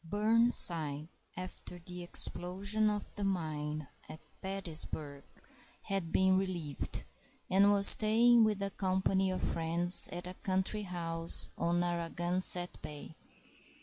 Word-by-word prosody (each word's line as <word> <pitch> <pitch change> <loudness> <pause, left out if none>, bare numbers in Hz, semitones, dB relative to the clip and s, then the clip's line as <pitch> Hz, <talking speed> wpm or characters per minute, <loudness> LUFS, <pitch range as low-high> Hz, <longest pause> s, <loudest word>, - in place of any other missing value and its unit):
Burnside, 170 -7 +3 0.3
after 180 -1 -9
the 180 +1 -11
explosion 195 +5 -3
of 210 -1 -6
the 205 - -6
mine 155 -5 -5 0.2
at 155 - -11 0.2
Petersburg, 160 -6 -5 0.6
had 195 -5 -5
been 190 0 +1
relieved, 175 -7 -6 0.5
and 200 +2 +3
was 200 -1 +5
staying 230 +2 +5
with 210 -2 -1
a 195 - -4
company 190 0 -2
of 185 - -5
friends 170 +2 +1
at 175 0 -8
a 180 - -8
country 190 +3 -3
house 165 -3 +2
on 175 +1 -2
Narragansett 175 +1 -1
Bay. 150 +1 -11
180 Hz, 115 wpm, -31 LUFS, 165-195 Hz, 0.6 s, was